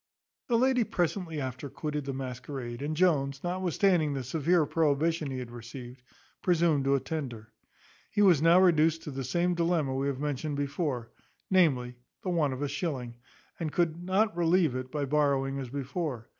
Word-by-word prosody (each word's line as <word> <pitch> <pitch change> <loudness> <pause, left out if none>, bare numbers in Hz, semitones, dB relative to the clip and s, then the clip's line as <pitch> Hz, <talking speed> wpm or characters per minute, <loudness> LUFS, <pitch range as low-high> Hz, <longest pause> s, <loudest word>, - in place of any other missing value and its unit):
The 235 - +3
lady 255 0 +3
presently 175 -4 -2
after 130 +1 -5
quitted 150 +1 -4
the 135 - -2
masquerade, 125 -1 -6
and 150 +2 -3
Jones, 140 -6 +2
notwithstanding 175 -3 +1
the 135 - -3
severe 160 +5 +2
prohibition 155 +1 +1
he 130 - -4
had 125 -2 -6
received, 120 +1 -9 0.4
presumed 165 -5 +2
to 140 0 +4
attend 135 -1 -3
her. 110 -1 -13 0.6
He 205 - +2
was 175 -7 +5
now 165 +2 +6
reduced 165 -3 +4
to 150 - -6
the 135 0 -4
same 175 +7 +1
dilemma 165 -5 +1
we 135 +1 -1
have 135 -2 -2
mentioned 145 0 -2
before, 140 -4 -2 0.4
namely, 130 -10 +3 0.3
the 185 - -1
want 155 -5 +2
of 130 +3 -4
a - - 0
shilling, 135 -5 -4 0.4
and 160 -3 -2
could 170 0 0
not 190 +1 +1
relieve 170 -3 +3
it 130 0 -5
by 145 -2 -1
borrowing 140 -1 +1
as 130 -3 -5
before. 140 -2 -4
150 Hz, 170 wpm, -29 LUFS, 135-170 Hz, 0.6 s, now